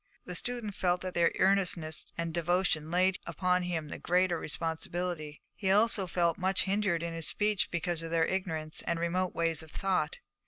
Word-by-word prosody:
The 180 - -5
student 230 +2 -1
felt 180 -1 +1
that 185 -1 -4
their 170 -1 +3
earnestness 180 -5 +2
and 170 -1 -2
devotion 170 -2 +1
laid 185 +2 +2
upon 180 +2 +1
him 165 -4 -3
the - - -6
greater 180 -1 +2
responsibility; 165 -1 -4
he 190 - -2
also 205 -1 +4
felt 170 -2 +1
much 190 +1 +1
hindered 195 -4 +1
in 170 -1 -3
his 165 -1 -4
speech 210 -1 +1
because 170 -1 -2
of 165 - -5
their 165 0 +3
ignorance 160 -5 -2
and 170 - 0
remote 180 +2 0
ways 165 -1 +1
of 160 - -12
thought. 195 - 0
175 Hz, 175 wpm, -31 LUFS, 165-190 Hz, -, also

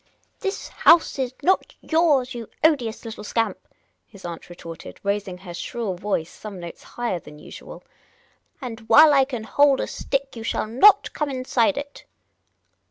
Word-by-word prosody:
" - - -36
This 390 -1 -4
house 330 -4 +4
is 255 -2 -1
not 375 +5 +1
yours, 300 -6 +2
you 235 -2 -7
odious 250 -8 +1
little 220 -2 -7
scamp," 225 +2 -1 0.5
his 200 -4 -14
aunt 170 0 -7
retorted, 165 -2 -10
raising 200 -2 -2
her 180 -1 -10
shrill 220 +3 -4
voice 180 -3 -2
some 205 -3 -9
notes 170 -1 -9
higher 240 -7 -4
than 150 -2 -14
usual; - - -11 0.4
" - - -39
and 225 -2 -7
' - - -7
ile 305 0 +8
I 270 -1 +5
can 250 -5 -5
hold 285 +4 +3
a - - 0
stick 275 -1 -3
you 230 - -7
shall 225 - -1
not 320 - +5
come 300 -2 -2
inside 255 0 +1
it." 285 0 -7
235 Hz, 170 wpm, -23 LUFS, 200-280 Hz, 0.5 s, ile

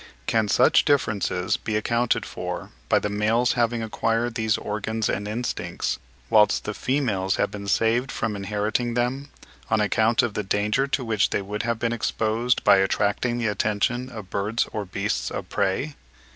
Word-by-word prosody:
Can 110 -3 +1
such 125 +5 +5
differences 105 -10 +1
be 110 - -3
accounted 115 +2 +1
for - - -5 0.2
by - - +5
the - - 0
males 110 +4 +2
having 120 -1 0
acquired 115 +2 0
these 110 -2 +1
organs 110 +1 -2
and 105 +1 -2
instincts, 115 +4 -3 0.3
whilst 105 -1 +4
the 105 - -3
females 105 -8 0
have - - 0
been 100 -1 -7
saved 115 +6 +2
from 110 -1 -2
inheriting 105 +4 -1
them, 130 +4 -1 0.4
on 110 - +2
account 110 +2 +3
of 120 -3 -1
the 105 - -1
danger 105 +7 +1
to 135 -2 -1
which 110 -2 +2
they 100 - -1
would 105 +2 -3
have 115 -1 -1
been 115 +1 -1
exposed 115 +1 0
by - - +7
attracting 105 +5 +1
the 120 - -1
attention 110 +4 0
of 110 -6 -9
birds 105 +4 0
or 105 -2 -3
beasts 100 +3 -2
of - - -5
prey? 100 +10 0
110 Hz, 170 wpm, -24 LUFS, 105-120 Hz, 0.4 s, by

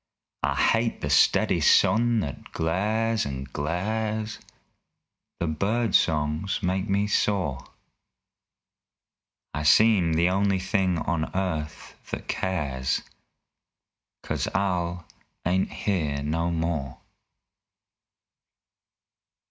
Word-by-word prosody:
I - - 0
hate 115 0 +1
the 75 - -2
steady - - +4
sun 115 0 +4
that 70 -7 -7
glares, 105 +7 0
and 70 -1 -6
glares! 110 +8 -2 1.0
The 85 - 0
bird 100 +8 0
songs 80 +5 +1
make 95 +2 -1
me 100 +1 +2
sore. 95 -11 0 1.9
I 75 - -2
seem 90 +1 +5
the 85 +2 +3
only 100 +1 +2
thing 95 -1 0
on 80 0 -1
earth 80 -6 -3 0.2
that - - -5
cares 70 -8 -1 1.2
'Cause - - -2
Al 90 -3 -1 0.4
ain't 90 +2 +1
here 75 -8 -1
no 80 +3 -1
more! 80 -5 -2
90 Hz, 90 wpm, -26 LUFS, 75-100 Hz, 1.9 s, seem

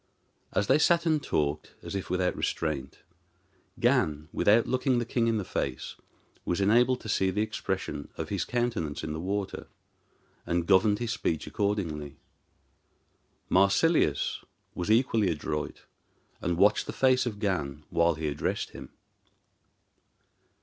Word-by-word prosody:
As - - +1
they 150 - +4
sat 170 +2 +3
and 155 -2 +2
talked, 75 - -2
as - - -6
if 95 -1 -4
without 90 0 0
restraint, 75 -5 -3 0.8
Gan, 75 +1 +1
without 110 +3 +4
looking 130 0 +1
the 120 - 0
king 115 0 0
in 115 -1 +2
the 105 - -2
face, 65 -5 -3 0.5
was 90 - -1
enabled 120 +5 +3
to - - -9
see 95 -2 +1
the 105 +3 0
expression 110 -8 -4
of - - -4
his - - -1
countenance 120 -13 -2
in 80 -1 -3
the 80 - -4
water, 100 +3 -3 0.8
and 85 0 -1
governed 100 +3 +4
his 120 0 -3
speech 95 -9 -1
accordingly. 80 -8 -2 1.3
Marsilius 100 - +2 0.3
was 90 +3 -4
equally 110 -3 +3
adroit, 75 -1 -3 0.6
and 85 -2 -1
watched 105 +3 +4
the - - -4
face 130 -1 +3
of 110 -4 -4
Gan 75 -9 -2
while 85 0 +3
he 80 0 -3
addressed 75 - -2
him. - - -10
100 Hz, 140 wpm, -28 LUFS, 80-115 Hz, 1.3 s, they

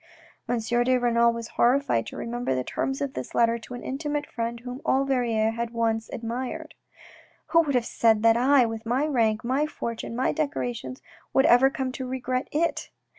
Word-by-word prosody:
M. 245 - +1
de 240 +3 +2
Renal 235 -1 +3
was 230 0 -6
horrified 240 - +2
to - - -8
remember 240 - -2
the 130 - -1
terms 270 - -3
of 280 -1 -2
this - - -6
letter 230 0 +3
to 240 +2 -9
an 245 - -8
intimate 295 +2 -3
friend 235 -2 -4
whom 250 +2 -7
all 270 +1 +2
Verrieres 230 -5 +1
had 235 0 -3
once 225 -1 -1
admired, 255 +8 -5 0.4
" - - -26
Who 335 - +5
would 285 -5 -1
have 245 -2 +2
said 225 -2 +2
that 225 0 +6
I, 255 +1 +4
with 225 -1 -5
my 245 +6 0
rank, 225 -7 +1
my 265 +5 +1
fortune, 230 -6 -5
my 250 -8 +1
decorations, 130 -4 -3 0.3
would 265 - +5
ever 250 +3 +6
come 265 -1 -3
to 260 0 -5
regret 255 +1 -2
it 335 +3 -1
240 Hz, 190 wpm, -26 LUFS, 230-265 Hz, 0.4 s, that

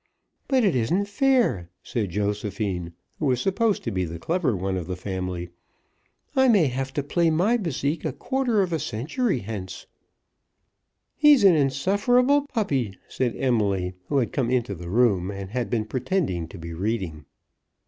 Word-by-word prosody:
"But 260 -3 +3
it 195 -8 +3
isn't 170 - +1
fair," 215 - +2
said 110 -5 -2
Josephine, 100 -2 -2 0.3
who 150 - 0
was 125 -2 +2
supposed 200 - +1
to 115 - -2
be 95 -2 -1
the 85 -1 -5
clever 160 - 0
one 95 +1 -2
of 90 -3 -4
the 90 - -3
family. 90 -2 -4 0.8
"I 265 0 +5
may 205 -9 +5
have 135 0 -2
to 145 -3 -1
play 165 +3 +2
my 180 +9 +2
bésique 160 - -2
a - - -1
quarter 250 -6 0
of 180 -2 -3
a 160 - 0
century 150 - -1
hence." 100 -3 -6 1.3
"He's 295 -5 +6
an 195 -3 +8
insufferable 205 - +2
puppy," 135 - -1
said 125 -3 -1
Emily, 100 -8 +1
who 145 - 0
had 125 -4 0
come 130 -5 0
into 120 -5 0
the 85 -1 -8
room, 100 -4 +2
and 100 -1 -6
had 125 0 -2
been 110 -3 0
pretending 125 - -1
to - - -11
be 85 0 -7
reading. 90 -5 -3
125 Hz, 165 wpm, -25 LUFS, -, 1.3 s, an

